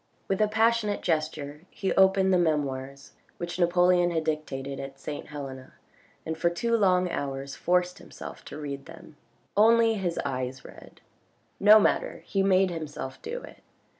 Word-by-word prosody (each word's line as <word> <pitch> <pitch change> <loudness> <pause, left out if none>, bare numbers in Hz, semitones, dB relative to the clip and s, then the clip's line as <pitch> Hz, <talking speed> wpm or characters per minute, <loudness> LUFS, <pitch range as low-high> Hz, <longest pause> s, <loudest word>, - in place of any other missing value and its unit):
With 195 +1 0
a 215 - +4
passionate 220 -1 +1
gesture 155 -3 -2
he 195 - -2
opened 190 0 +4
the 180 - +4
Memoirs 140 -4 -2 0.3
which 175 +1 -5
Napoleon 175 0 +4
had 165 -2 -1
dictated 140 -3 -3
at 135 0 -8
St. 145 +1 -6
Helena 135 -3 -8 0.5
and 160 - -3
for 170 +2 +1
two 230 +7 0
long 185 -4 +3
hours 135 0 -4
forced 180 0 0
himself - - -10
to - - -8
read 140 -2 -6
them. 155 - -13 0.4
Only 225 +2 +5
his 185 -5 -2
eyes 130 0 -4
read; - - -14 0.6
no 210 +2 +8
matter, - - 0
he 195 - 0
made 190 -1 +3
himself 150 -5 -6
do - - -5
it. - - -12
170 Hz, 155 wpm, -27 LUFS, 140-195 Hz, 0.6 s, no